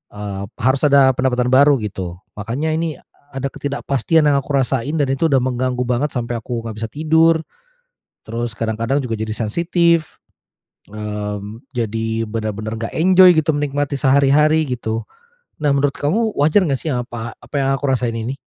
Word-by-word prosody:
eee, 100 -1 -5 0.2
harus 130 +1 +1
ada 140 -2 +5
pendapatan 125 -1 0
baru 140 +2 +6
gitu. 90 -4 -5 0.2
Makanya 130 +10 -2
ini, 160 -1 -2
eee, - - -28 0.3
ada 135 0 -3
ketidakpastian 140 +2 0
yang 140 - +3
aku 140 +1 -3
rasain, 135 +2 0
dan 145 -3 +1
itu 150 +5 +1
udah 135 -4 +2
mengganggu 125 0 -1
banget 125 +4 -1
sampai 120 -1 -2
aku 115 +1 -5
nggak 115 -2 -6
bisa 115 - -3
tidur. 160 +4 +2 0.8
Terus 115 0 -4
kadang-kadang 115 +5 -1
juga 115 -3 -3
jadi 110 0 -3
sensitif, 170 - +1 0.8
mmm, 105 +1 -6
jadi 115 -1 -2
bener-bener 110 0 -4
nggak 115 - -5
enjoy 185 +1 +6
gitu 155 0 +2
menikmati 145 -1 -2
sehari-hari 145 +3 +4
gitu. 115 -2 -3 0.6
Nah, 145 - +4
menurut 140 0 +1
kamu 215 +9 0
wajar 150 +7 +4
nggak 135 - +1
sih 155 - -2
apa 120 -2 -4
apa - - -18
yang 135 -1 +1
aku 140 +1 -3
rasain 125 -3 0
ini? 120 +4 -4
130 Hz, 160 wpm, -19 LUFS, 115-145 Hz, 0.8 s, baru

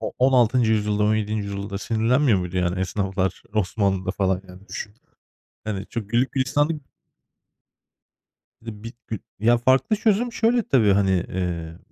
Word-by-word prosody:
o 110 - -4
16. 125 -3 +4
yüzyılda, 105 -1 +1
17. 110 0 0
yüzyılda 100 0 -5
sinirlenmiyor 115 +1 +2
muydu, 90 0 -4
yani, 90 +1 0
esnaflar, 95 -1 -2
Osmanlı'da 95 -2 0
falan? 95 -1 0
Yani 95 +3 -14
düşün. 105 0 -6 0.7
Yani 100 -2 -3
çok 105 -3 -6
güllük 120 +3 +1
gülistanlık 145 +3 0 1.8
Bir - - -20
de 105 0 -14
bir 115 - -6
gü 110 - -4 0.2
Ya 120 +3 +4
farklı 130 - +3
çözüm 225 +3 +1
şöyle 235 0 +2
tabii: 110 - +3
Hani, 95 -1 +2
eee, 90 -3 -2
105 Hz, 140 wpm, -23 LUFS, 95-125 Hz, 1.8 s, 16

